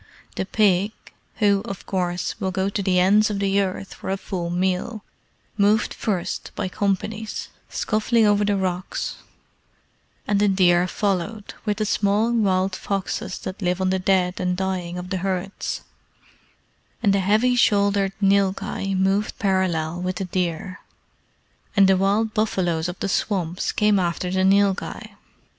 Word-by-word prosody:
The 190 - -2
pig 205 -1 +2 0.4
who, 200 -3 +3
of 195 -4 -7
course, 180 +1 -2
will 190 -3 -1
go 190 +1 -1
to 200 - -2
the 185 -2 +1
ends 205 +4 +4
of 205 - -2
the 200 0 +2
earth 195 0 -4
for - - -7
a 195 - 0
full 180 -3 -4
meal 185 +5 -1 0.6
moved 210 +2 +3
first 185 -5 -3
by 185 - -2
companies, 210 +3 -2 0.2
scuffling 220 +1 +1
over 205 0 +3
the 205 -1 +1
rocks, 185 -1 -3 1.1
and 205 -1 +2
the 205 - +4
deer 180 -2 +4
followed, 200 +2 -2
with 210 -2 0
the 215 - 0
small 210 +2 +2
wild 190 -4 +1
foxes 195 -1 -3
that 190 +3 -6
live 180 0 0
on 185 0 +1
the 190 - +1
dead 185 -1 +1
and 180 0 0
dying 185 -2 -2
of 180 0 -7
the 190 - 0
herds; 190 +1 -3 1.2
and 200 -3 +4
the 200 - +2
heavy 215 +6 +3
shouldered 200 -4 +3
nilghai 195 -1 +1
moved 195 +2 +1
parallel 180 -4 0
with 185 0 -2
the 190 - -3
deer, 180 0 -3 1.0
and 195 -1 +7
the 190 - +5
wild 205 +4 +1
buffaloes 175 -6 0
of 180 - -6
the - - 0
swamps 185 -3 -1
came 210 -1 +3
after 180 0 -1
the 190 0 +1
nilghai. 195 0 +1
195 Hz, 150 wpm, -23 LUFS, 185-205 Hz, 1.2 s, and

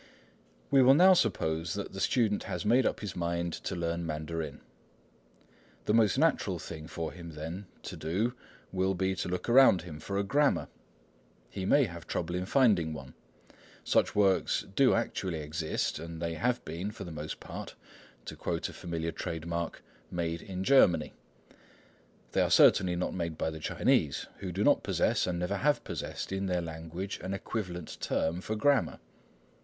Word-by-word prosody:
We 135 -1 +6
will 130 +2 +7
now 185 +4 +8
suppose 80 - 0
that 100 -1 -5
the 95 - -6
student 110 0 +1
has - - -4
made 120 +4 +4
up - - -2
his 105 -4 -5
mind 85 -1 -1
to 95 - -4
learn 85 0 -2
Mandarin. 80 -1 -4 1.2
The 105 - +2
most 115 0 +4
natural 140 - +2
thing 80 -1 -8
for 80 -1 -4
him, 85 -2 -9
then, 85 +6 -6 0.2
to - - -6
do 100 +10 -1 0.4
will 95 0 +1
be 95 +1 0
to - - -2
look 90 0 -3
around 120 -8 +6
him 80 -4 -8
for 100 +5 -4
a 100 - +1
grammar. 140 +8 +2 0.8
He 95 -2 -4
may 145 - +5
have 85 - -6
trouble 85 0 -2
in 90 +1 -2
finding 100 - +3
one. 70 -3 -9 0.7
Such - - +2
works 100 0 +2
do 135 -2 +5
actually 95 -6 -2
exist, 80 0 -2
and 85 0 -7
they 85 0 -2
have 125 +8 -1
been, 90 +5 -4
for 105 -1 -8
the 85 - -7
most 75 0 -6
part, - - -8 0.5
to - - -7
quote - - -2
a - - -10
familiar 85 -2 -3
trade 80 -1 -5
mark, 85 0 -3 0.3
"made 85 -1 -2
in 95 -1 -5
Germany." 95 - +4 1.2
They - - +2
are - - +2
certainly 90 -2 +5
not 90 - -2
made 85 -3 -3
by 80 - -1
the 80 - -7
Chinese, - - +1
who 95 -2 -4
do 95 +4 -1
not - - +4
possess, - - +1
and 90 -1 -1
never 90 +3 -1
have 145 +8 +2
possessed, - - -5
in 95 0 -1
their 90 -1 +1
language, 85 +4 -6
an 95 +2 -3
equivalent 90 -5 -5
term 85 +3 0
for 110 - -3
grammar. 140 +5 +2
90 Hz, 175 wpm, -30 LUFS, 85-105 Hz, 1.2 s, now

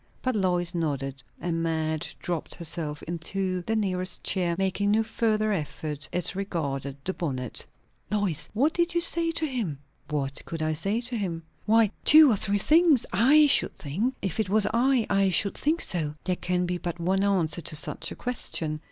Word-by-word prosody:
But 255 -2 0
Lois 180 -3 0
nodded; 140 -5 -3 0.2
and 165 -1 -2
Madge 160 -1 -2
dropped 170 -3 -3
herself 155 -3 -4
into 185 +2 -3
the 220 +6 -2
nearest 185 -4 -2
chair, 175 -3 +1
making 195 +1 0
no 220 +2 +3
further 215 -1 0
effort 150 -4 -4
as 180 +2 -1
regarded 140 -8 -3
the 190 - -1
bonnet. 130 -9 -3 0.5
"Lois! 200 -7 0
What 285 +8 +2
did 345 0 0
you - - +4
say 335 0 +3
to 320 - +1
him?" 230 - -3 0.3
"What 140 -2 -3
could 165 -1 -4
I 155 0 0
say 200 +9 -1
to 245 0 -1
him?" 175 -6 -3 0.2
"Why, 220 -1 +4
two 305 -2 +8
or - - +3
three 200 +1 0
things, 310 - +4
I 270 +10 +6
should 285 - +4
think. 200 - -2
If 190 +1 -2
it 215 - 0
was 210 +1 +3
I, 245 0 +2
I 195 -1 +2
should 195 +2 +2
think 320 +4 0
so." 155 -4 -1
"There 185 - 0
can 180 0 -1
be 175 0 -2
but 175 0 -5
one 190 +3 +1
answer 175 -5 +1
to 160 0 +1
such 150 - +1
a - - -6
question. 160 -10 -3
185 Hz, 185 wpm, -26 LUFS, 160-220 Hz, 0.5 s, two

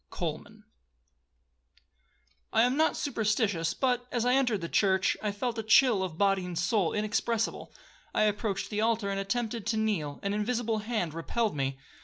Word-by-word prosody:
COLMAN - - -5 1.9
'I 225 - +5
am 250 +2 +2
not 315 +2 +2
superstitious, 210 - 0
but, 250 -2 0
as 240 -1 0
I 250 - +3
entered 245 -7 +2
the 170 - -3
church, 190 +1 +2
I 210 - -1
felt 230 +3 -3
a - - 0
chill 220 -1 +5
of 180 -4 -4
body 195 -1 +2
and 180 -2 -5
soul 185 0 +1
inexpressible. 220 +2 -1 0.4
I - - +2
approached 210 -1 -1
the 210 0 -1
altar, 220 -3 +1
and 195 - -2
attempted 220 +1 -2
to 220 0 0
kneel,—an 200 -4 -1
invisible 225 +1 -1
hand 215 -7 -2
repelled 210 +6 -1
me. 135 -1 -2
215 Hz, 160 wpm, -29 LUFS, 195-230 Hz, 1.9 s, I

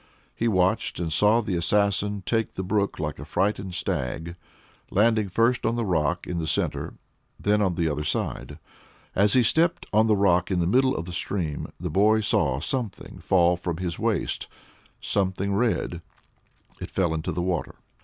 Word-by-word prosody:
He 115 - -1
watched, 95 +1 +1
and 80 -2 -2
saw 105 +7 +4
the 105 -4 -3
assassin 100 +2 +1
take 115 -2 -1
the 95 - -3
brook 100 +1 0
like 75 -1 -4
a - - -6
frightened 95 -2 -1
stag, 80 +7 -3 0.5
landing 110 0 +2
first 115 +5 +2
on 115 - +1
the 120 -1 -1
rock 85 -2 0
in 90 -1 -3
the 80 - -3
centre, - - -1 0.4
then 105 +1 +2
on 95 -4 +1
the 85 -1 0
other 75 -1 -2
side. 75 - -3 0.6
As 100 +1 +3
he 125 - +5
stepped 170 +8 +2
on 110 +1 +4
the 110 - +4
rock 90 -2 +3
in 95 -2 0
the 85 - +1
middle 130 +8 +3
of 85 - -4
the 90 - -7
stream, 85 -5 -3
the 90 -1 -4
boy 105 +5 +4
saw 95 - +1
something 120 - -3
fall 90 -1 +3
from 85 -1 -4
his 90 -2 -4
waist - - -1 0.5
something 100 0 -1
red. 100 -6 0 0.8
It - - -6
fell 85 -4 0
into 80 -1 -2
the 85 +2 -2
water. 90 -3 -2
95 Hz, 175 wpm, -25 LUFS, 85-110 Hz, 0.8 s, he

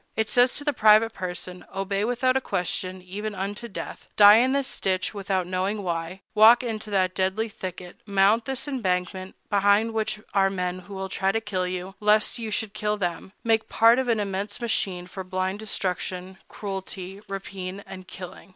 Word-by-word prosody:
It 220 0 0
says 245 +1 +4
to 290 - -3
the 290 0 +1
private 220 -1 +5
person: 180 -1 -6
"Obey 195 +1 -1
without 250 +2 +1
a 265 - +2
question, 185 -2 -3
even 205 +3 -5
unto 205 +5 -4
death; 205 - -7
die 205 +1 +9
in 255 +3 +3
this 275 -1 -2
ditch, 185 +1 0
without 195 -2 -1
knowing 190 +3 -1
why; 170 +1 -3
walk 225 +3 +7
into 220 -2 -4
that 185 -2 +1
deadly 190 +4 0
thicket; 185 -3 -8
mount 200 +3 +3
this 265 +1 -3
embankment, 185 -7 -2 0.2
behind 205 +3 +3
which 215 -1 -1
are 195 -1 +4
men 180 -1 -2
who 195 +2 -10
will 190 0 -3
try 190 0 0
to 225 - 0
kill 190 -4 -2
you, 185 +1 -4
lest 210 +3 +3
you 225 -1 -4
should 215 0 -2
kill 210 0 -1
them; 175 -1 -3
make 225 -1 +2
part 230 +2 +5
of 260 - -1
an 230 -2 +2
immense 200 0 -3
machine 195 -6 -1
for 190 +1 -7
blind 185 +2 -2
destruction, 185 -2 -3
cruelty, 195 -1 -6
rapine, 195 0 -6
and 185 -1 -10
killing." 185 +1 -10
195 Hz, 180 wpm, -25 LUFS, 185-220 Hz, 0.2 s, die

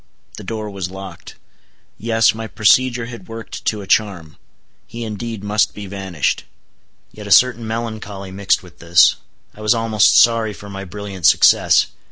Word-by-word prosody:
The - - -9
door 110 -2 -5
was 95 -2 -5
locked. 95 -2 -10 0.6
Yes, 115 +1 +2
my 110 0 -6
procedure 120 +3 +2
had 115 -6 -10
worked 115 0 -9
to 105 -2 -1
a 95 - -10
charm; 95 -8 -1 0.5
he 120 0 -7
indeed 110 -1 -6
must 105 +1 0
be 105 - -7
vanished. 95 -5 -3 0.7
Yet 105 -1 -10
a - - -6
certain 120 +2 +4
melancholy 110 -4 -6
mixed 95 0 0
with 90 -1 -17
this: 85 +1 +4 0.4
I 110 - -14
was 110 +2 +2
almost 115 -2 +3
sorry 115 -2 +4
for 100 0 -11
my 100 0 -7
brilliant 100 -2 -3
success. - - +5
105 Hz, 160 wpm, -18 LUFS, 95-115 Hz, 0.7 s, success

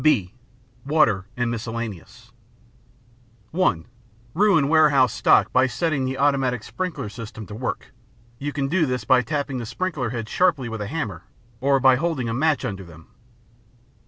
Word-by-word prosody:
(b) 115 -12 +2 0.5
Water 135 -10 +2
and 120 -1 0
miscellaneous 115 0 -6 1.2
(1) 120 - +1 0.5
Ruin 170 -6 +3
warehouse 145 -4 +4
stock - - +3
by 130 +1 +4
setting 145 +1 -1
the 130 +1 -3
automatic 135 -4 +1
sprinkler 170 -10 -4
system 110 0 -8
to 105 - -10
work. 125 +3 -5 0.5
You 145 +1 -3
can 140 -1 -2
do 165 +1 +1
this 125 -1 -2
by 130 -1 +4
tapping 140 +1 -3
the 120 - -5
sprinkler 145 -2 -2
heads 115 -2 -5
sharply 170 -9 +2
with 115 -1 -5
a 105 - -3
hammer 105 - -4 0.3
or 135 +1 +3
by 130 -1 +5
holding 155 -6 -1
a 115 - -2
match 150 +2 +1
under 100 -5 -4
them. 80 -2 -15
130 Hz, 155 wpm, -23 LUFS, 115-150 Hz, 1.2 s, by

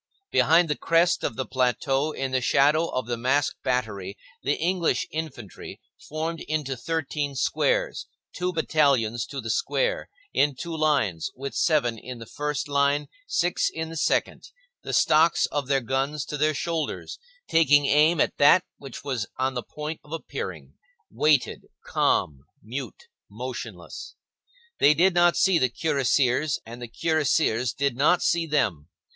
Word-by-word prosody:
Behind 165 +2 +4
the 150 - 0
crest 170 +3 +2
of - - -2
the 130 - -3
plateau, 135 +3 0
in 135 -3 -3
the 130 0 +1
shadow 150 +6 +3
of 130 -5 -3
the 120 0 -3
masked 130 +4 0
battery, 105 -7 -2 0.2
the 145 - 0
English 175 +1 0
infantry, 135 - -7 0.3
formed 160 +2 -3
into 150 -4 -2
thirteen 145 0 -3
squares, - - 0 0.3
two 180 0 -1
battalions 140 -9 +1
to 140 - -6
the 115 -3 -3
square, - - -1 0.2
in 145 -1 +2
two 170 +4 -5
lines, 145 - +1
with 135 +2 -6
seven 120 -9 +1
in 125 +2 -8
the 115 - -9
first 150 +4 -3
line, 140 +1 +1 0.2
six 180 - +1
in 160 0 -5
the 165 - -8
second, 160 - -1 0.3
the - - -6
stocks 160 +2 +4
of 145 -3 -2
their 135 -1 +2
guns 135 +3 -2
to - - -5
their 150 +1 +1
shoulders, 165 +1 -3 0.3
taking 145 -3 +4
aim 155 +4 +4
at - - +1
that 175 +5 +6 0.2
which 135 -3 -9
was 125 -8 -3
on 130 +1 0
the 125 - -3
point 150 +5 -6
of 150 - -18
appearing, 165 - -6 0.4
waited, 150 -4 +1 0.2
calm, 70 -3 +1 0.2
mute, 125 +5 -7 0.3
motionless. - - -7 0.6
They 150 +1 +6
did 180 +4 +4
not 175 0 +4
see 170 +1 +4
the 130 - +2
cuirassiers, 135 +1 +1
and 120 +2 -10
the 120 - -7
cuirassiers 150 -5 +1
did 140 -2 -1
not 150 +7 +3
see 170 -1 +1
them. 100 - 0
145 Hz, 150 wpm, -25 LUFS, 130-160 Hz, 0.6 s, that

